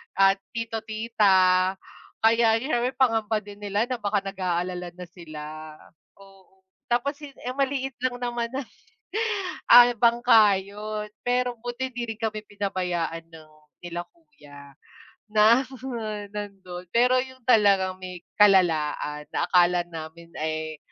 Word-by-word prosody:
ah, 195 0 +6 0.2
tito, 230 -1 -3
tita. 195 -4 +3 0.5
Kaya 225 0 +5
syempre 255 -2 -1
pangamba 225 -4 +1
din 205 0 -12
nila 205 +1 -1
na 250 - -2
baka 205 -2 -1
nag-aalala 180 -2 -3
na 180 - -8
sila, 155 -2 -9 0.4
oo, 195 -1 -20 0.3
tapos 280 +5 0
yun, 290 -3 -11 0.2
maliit 270 -1 -1
lang 250 -1 -1
naman 240 -1 -2
na, 275 - -2 1.1
ah, 245 0 +10
bangka 230 -2 +5
'yon. 210 +2 -6 0.2
Pero 245 0 0
buti 245 +3 -4
hindi 240 -2 -4
rin - - -30
kami 215 -1 -1
pinabayaan 180 -5 -3
ng 160 -2 -15 0.3
nila 175 0 -4
kuya 145 - -16 0.6
na 220 +4 +5 0.7
nandon. 195 -4 -7
Pero 250 +2 +4
yung 260 0 -12
talagang 200 -5 +4
may 180 -2 -8 0.2
kalalaan 160 -6 +3
na - - 0
akala 180 0 +4
namin 165 0 -9
ay 155 0 -3
205 Hz, 125 wpm, -25 LUFS, 180-235 Hz, 1.1 s, ah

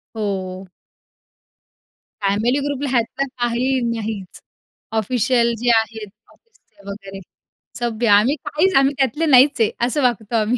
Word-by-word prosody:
हो. 190 -3 -4 1.6
फॅमिली 215 +7 +1
ग्रुपला 285 0 -3
ह्यातलं 255 +2 -1
काही 245 +2 0 0.2
नाहीच, 210 -4 -6 0.6
ऑफिशल 235 +1 +1
जे 245 0 0
आहेत 220 -1 -3 0.2
ऑफिसचे 215 - -24
वगैरे. 195 -1 -8 0.6
सभ्य, 235 -1 -1
आम्ही 210 +8 +4
काहीच, 365 +6 +1
आम्ही 270 +1 +3
त्यातले 275 +4 0
नाहीच 275 -3 +5
आहे, 215 - +3
असं 290 +4 -1
वागतो 235 -2 0
आम्ही. 225 +4 0
235 Hz, 120 wpm, -20 LUFS, 210-265 Hz, 1.6 s, नाहीच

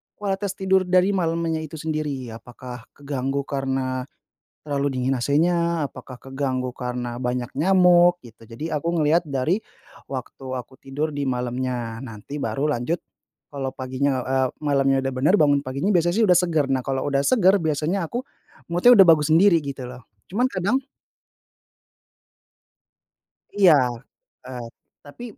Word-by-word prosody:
kualitas 195 -1 -2
tidur 190 -1 +2
dari 185 +1 +4
malamnya 165 -3 -1
itu 155 - -10
sendiri, 150 -5 -3
apakah 125 +1 -10
keganggu 140 -1 -3
karena 135 -2 -2 0.6
terlalu 140 -1 -1
dingin 130 +1 +1
AC-nya, 165 +4 +1
apakah 130 -2 -11
keganggu 135 -1 -3
karena 125 -1 -4
banyak 125 -1 -2
nyamuk 175 +1 +5
gitu, 115 0 -16
jadi 150 +8 -5
aku 170 +4 -2
ngelihat 155 +3 +3
dari 155 +8 -1 0.5
waktu 130 0 -7
aku 125 +1 -10
tidur 145 +3 -3
di 145 - -1
malamnya, 125 -2 -3
nanti 115 +4 -8
baru 140 +2 -1
lanjut 140 +9 -2 0.5
kalau 135 -2 -4
paginya, 130 +1 -1
eee, 130 0 +1
malamnya 135 -2 +2
udah 135 - -1
bener 145 +10 +3
bangun 145 -1 +4
paginya 135 +8 -2
biasa 175 -1 +2
sih 225 +2 +3
udah 180 - +6
seger, 160 -6 +1
nah 130 -2 0
kalau 135 -1 -2
udah 140 -1 +1
seger 200 - +4
biasanya 160 +3 -1
aku 240 - -3 0.5
mood-nya 180 +9 +5
udah 195 -3 +8
bagus 155 -2 +5
sendiri 170 +1 +6
gitu 135 -3 -6
loh, 125 -1 -12 0.3
cuman 220 +7 +1
kadang 200 +5 0 2.8
Iya, 190 -4 +7 0.7
eee, 125 -2 -7 0.4
tapi 145 +12 -11
145 Hz, 140 wpm, -23 LUFS, 130-170 Hz, 2.8 s, udah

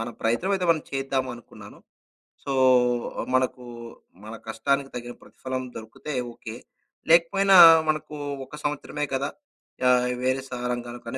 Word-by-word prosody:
మన 115 - -3
ప్రయత్నమైతే 180 +12 0
మనం 160 -2 +2
చేద్దామనుకున్నాను. 130 -3 -5 0.7
సో, 140 - -3 0.8
మనకు 130 -1 0 0.6
మన 110 - -8
కష్టానికి 140 +4 -1
తగిన 120 0 -6
ప్రతిఫలం 130 0 -6
దొరికితే 110 +7 -8 0.2
ఓకే. 115 -1 -9 0.6
లేకపోయినా 190 +3 +5 0.3
మనకు 155 0 -2 0.3
ఒక 150 - -11
సంవత్సరమే 150 0 -3
కదా! 140 +2 -1 0.6
యాహ్! 125 0 +4 0.2
వేరే 130 +1 +1
సారంగానుకనే 120 0 -5
130 Hz, 105 wpm, -25 LUFS, 120-150 Hz, 0.8 s, లేకపోయినా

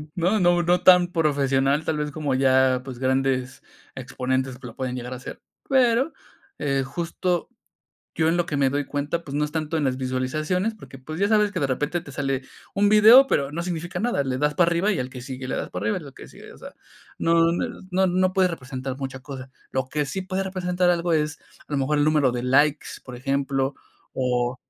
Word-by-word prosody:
no 180 +5 +1
no 175 -1 +3
no 175 +1 +2
tan 180 -1 +6
profesional, 140 -3 +1
tal 155 - -1
vez 150 0 -2
como 145 -2 -2
ya, 130 -1 +3
pues, 130 -3 -8
grandes 130 0 0 0.3
exponentes 130 0 -2
que 125 - -10
lo 115 - -11
pueden 130 -1 -3
llegar 125 0 -6
a - - -6
hacer, 125 - -9 0.3
pero, 260 +2 +3 0.7
justo 170 +4 -2 0.7
yo 160 - +1
en 165 - +2
lo 175 -1 0
que 150 - -3
me 140 -1 +3
doy 145 +2 -1
cuenta, 145 +4 -3
pues, 140 -4 -8
no 150 - +1
es 150 - -5
tanto 160 0 -2
en 155 - 0
las 130 -1 0
visualizaciones, 155 +11 -1
porque, 165 -10 -13
pues, 155 +6 -7
ya 200 - +3
sabes 210 -1 +3
que 180 - -3
de 140 - 0
repente 150 +6 -1
te 155 - -12
sale 135 -1 -2 0.3
un 205 +1 +3
video, 220 +6 +8
pero 140 - 0
no 170 +3 -3
significa 175 0 -4
nada, 225 -11 0
le 130 -1 -2
das 150 +1 +1
para 175 -1 +4
arriba 170 +5 +1
y 205 - 0
al 125 - -2
que 130 -1 -9
sigue 130 +1 -7
le 130 - -3
das - - -4
para 90 +2 -5
arriba 110 - 0
y - - -10
lo 140 -2 -11
que - - -12
sigue, - - -13
o - - -16
sea, - - -11 0.4
no 165 0 +3 0.4
no 190 +1 +2
no 185 +1 +2
puede 185 -1 +3
representar 130 -4 -5
mucha 135 -1 -5
cosa, 130 -1 -9 0.2
lo 130 0 -2
que 150 +1 -1
sí 190 +7 -4
puede 185 +1 -2
representar 180 -1 0
algo 170 0 0
es, 150 -1 0 0.3
a - - -10
lo 145 - +1
mejor, 140 +2 +1
el - - +3
número 150 -4 +3
de 120 0 -3
likes, 145 +4 +2 0.2
por 130 - -9
ejemplo, 135 +1 -1 0.4
o 125 -1 0
145 Hz, 220 wpm, -24 LUFS, 130-175 Hz, 0.7 s, video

